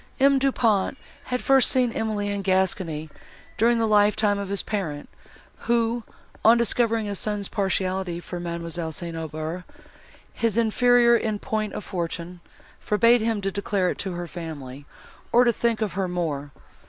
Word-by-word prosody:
M. 275 0 +5
Du 275 0 +2
Pont 225 -1 +1 0.3
had 250 0 -3
first 270 -1 +5
seen 250 -2 +2
Emily 215 -2 -2
in 200 0 -2
Gascony, 185 -5 0 0.4
during 235 +2 +3
the 230 - +2
lifetime 210 -1 +3
of 200 -1 -5
his 200 0 -2
parent, 165 -9 -3 0.6
who, 235 0 +1 0.4
on 230 +2 +7
discovering 230 -1 +1
his 200 -2 -3
son's 205 -2 -2
partiality 190 -3 -1
for 175 0 -7
Mademoiselle 170 -1 -4
St. 170 +1 -5
Aubert, 160 +2 -5 0.7
his 230 -2 -1
inferior 235 +1 +4
in 220 -2 0
point 215 0 -3
of - - -5
fortune, 175 0 -4 0.4
forbade 230 +3 +3
him 225 -2 0
to 195 0 -1
declare 200 -2 0
it - - -7
to 190 -2 -3
her 175 0 -4
family, 145 -6 -8 0.4
or 245 - +6
to 240 -1 +3
think 230 -1 0
of 210 - -3
her 195 -1 -1
more. 160 -5 -3
200 Hz, 160 wpm, -24 LUFS, 175-230 Hz, 0.7 s, on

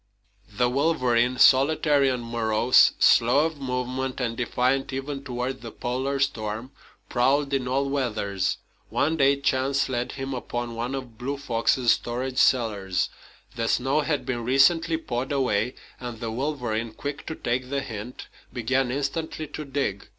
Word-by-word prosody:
The 120 +4 +2
wolverine, 125 -3 +2
solitary 140 +1 +5
and 125 -2 -2
morose, 115 +1 +4
slow 125 +6 +5
of 160 -3 -4
movement, 130 0 -3
and 115 -2 -1
defiant 130 +3 0
even 135 +1 -4
toward 130 0 -4
the 115 - -7
Polar 130 +4 -2
storm, 115 -2 -2 0.4
prowled 140 +3 +1
in 130 -2 0
all 135 +2 0
weathers. 105 -8 -1 0.3
One 155 +3 +1
day 140 -2 +4
chance 135 0 +1
led 125 0 -2
him 135 0 -4
upon 120 -1 -4
one 120 +3 -3
of 125 -4 -8
Blue 140 +3 -3
Fox's 120 -2 +2
storage 125 +2 -1
cellars. 105 -7 +2 0.5
The 115 -1 -1
snow 135 +6 +2
had 150 -1 -1
been 120 -2 -2
recently 160 +6 +3
pawed 130 -4 -4
away, 125 -3 0 0.2
and 120 -3 -6
the 115 -1 -4
wolverine, 120 -4 -2
quick 140 +4 -6
to 160 - -4
take 125 0 -2
the 140 0 -1
hint, 115 0 -7 0.2
began 125 +2 0
instantly 145 +4 -3
to 150 0 -6
dig. 135 -8 -2
130 Hz, 150 wpm, -25 LUFS, 120-140 Hz, 0.5 s, solitary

